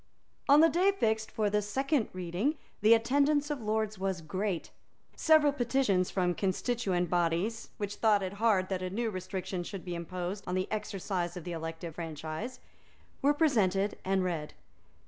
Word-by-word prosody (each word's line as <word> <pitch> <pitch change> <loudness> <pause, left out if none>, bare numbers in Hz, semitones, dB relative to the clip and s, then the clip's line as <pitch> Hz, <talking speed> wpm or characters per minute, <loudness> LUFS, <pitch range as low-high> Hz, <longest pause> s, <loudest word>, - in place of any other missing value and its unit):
On 290 +2 +8
the 325 - +8
day 365 +5 +3
fixed 220 - 0
for 215 -1 0
the 210 0 +2
second 265 +5 0
reading 185 - -1 0.2
the 220 +3 +7
attendance 285 +5 +2
of 290 -4 -3
lords 215 -1 -1
was 190 -2 -1
great. 185 +2 -3 0.4
Several 310 -3 +5
petitions 240 -8 +1
from 180 -2 +1
constituent 190 -1 0
bodies, 175 +7 0
which 205 -1 -4
thought 210 -3 +3
it 190 +1 -3
hard 205 -5 +3
that 190 -2 -2
a 185 - -2
new 225 +4 -1
restriction 185 -1 -4
should 190 +1 -7
be 175 - -4
imposed 180 +3 -4
on 180 - -1
the 185 0 0
exercise 190 -4 -3
of 175 - -7
the 175 - -5
elective 165 0 -5
franchise, 165 - -5 0.6
were 290 +2 +4
presented 210 - +2
and 190 0 +1
read. 165 -4 -3
200 Hz, 165 wpm, -31 LUFS, 180-235 Hz, 0.6 s, On